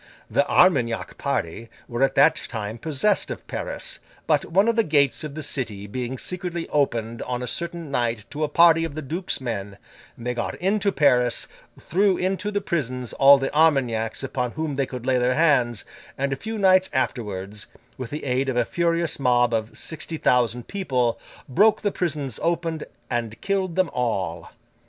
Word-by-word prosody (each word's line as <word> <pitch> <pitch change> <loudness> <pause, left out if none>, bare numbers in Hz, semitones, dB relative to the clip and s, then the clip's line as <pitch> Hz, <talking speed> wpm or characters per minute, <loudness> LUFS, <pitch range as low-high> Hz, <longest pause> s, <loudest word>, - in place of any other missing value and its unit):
The 140 - +2
Armagnac 130 -11 +2
party 115 - -2 0.2
were 120 +1 -4
at 135 - +3
that - - +5
time 110 -1 -5
possessed 160 - +1
of - - -6
Paris; - - -4 0.3
but, - - +2
one 195 +5 +2
of 230 - +2
the 230 - +3
gates 145 -4 +2
of 150 -2 -6
the 155 - -5
city 110 -9 -3
being 125 +4 -4
secretly 175 +2 -4
opened 115 -6 0
on 125 0 -3
a - - -4
certain 170 +2 -3
night 115 -4 -1
to 150 +1 -3
a 150 - 0
party 165 +1 +5
of 160 -3 -4
the 155 - -5
duke's 170 +7 -2
men, 100 -6 -5 0.4
they 125 +1 -3
got 120 - -3
into 200 +2 +1
Paris, 125 -6 +3 0.3
threw 195 +1 +2
into 190 +2 -1
the 205 -1 -1
prisons 125 - -2
all 140 +1 +7
the 135 +1 -3
Armagnacs 130 -8 +2
upon 125 -2 -2
whom 155 -2 -3
they 135 -1 -1
could 125 -2 -7
lay 130 -1 +2
their 125 +1 +2
hands, 125 -9 +2 0.3
and, 140 0 0
a - - -1
few 220 +10 -5
nights 190 -2 +4
afterwards, 105 -6 -3 0.3
with 130 -3 -6
the 150 +3 -5
aid 135 0 0
of 125 - -1
a 120 - +3
furious 170 0 0
mob 120 -2 +3
of 110 0 -2
sixty 160 0 -4
thousand 125 -3 +1
people, 130 -12 -1 0.3
broke 205 - +3
the 205 - +1
prisons 145 - -3
open, 165 -2 -1 0.3
and 115 -2 -2
killed 190 -3 -1
them 185 -2 +1
all. 100 -9 -2
135 Hz, 180 wpm, -24 LUFS, 120-170 Hz, 0.4 s, all